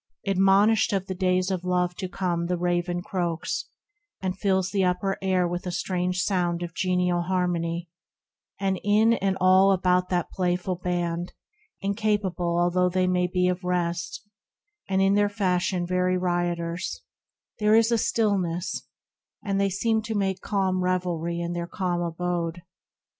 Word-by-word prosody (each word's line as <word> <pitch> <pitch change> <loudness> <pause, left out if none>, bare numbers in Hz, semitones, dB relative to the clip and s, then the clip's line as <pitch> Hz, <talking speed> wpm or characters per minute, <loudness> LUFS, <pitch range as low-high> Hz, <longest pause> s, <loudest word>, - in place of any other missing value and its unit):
Admonished 195 +3 +4
of 190 -1 0
the 190 - -4
days 185 0 +1
of 185 -2 -2
love 180 -1 +1
to 185 -1 -5
come 175 -3 -1
The 180 0 0
raven 175 0 -1
croaks, 175 -4 -2 0.5
and 185 -1 -2
fills 190 -1 0
the 195 -2 +1
upper 185 +2 0
air 185 -2 +2
With 175 +1 -4
a - - -2
strange 180 +1 -1
sound 175 -3 0
of 170 -1 -6
genial 180 -1 +1
harmony; 175 -1 -1 0.7
THE 195 - -3
RECLUSE 190 -1 0
39 205 0 +2
And 225 +1 +5
in - - +1
and 190 -1 +1
all 185 +1 +5
about 180 -1 +2
that 180 -2 -1
playful 180 0 -1
band, 175 -1 -2 0.5
Incapable 200 -4 0
although 180 +1 +2
they 185 0 +1
be 180 0 +1
of 180 +1 -1
rest, 175 +1 -2 0.6
And 190 0 +2
in 195 +1 +4
their 205 0 +3
fashion 185 -3 0
very 185 +1 +1
rioters, 175 0 -2 0.6
There 210 0 +4
is 225 +1 +4
a 235 - +4
stillness; 190 -6 0 0.6
and 195 -1 0
they 200 - +2
seem 220 +3 +1
to 220 0 -4
make 195 -2 -1
Calm 190 -2 0
revelry 175 -2 -1
in 170 0 -3
that - - -4
their 170 - -4
calm 175 -2 -2
abode. 175 0 -2
180 Hz, 160 wpm, -26 LUFS, 175-195 Hz, 0.7 s, And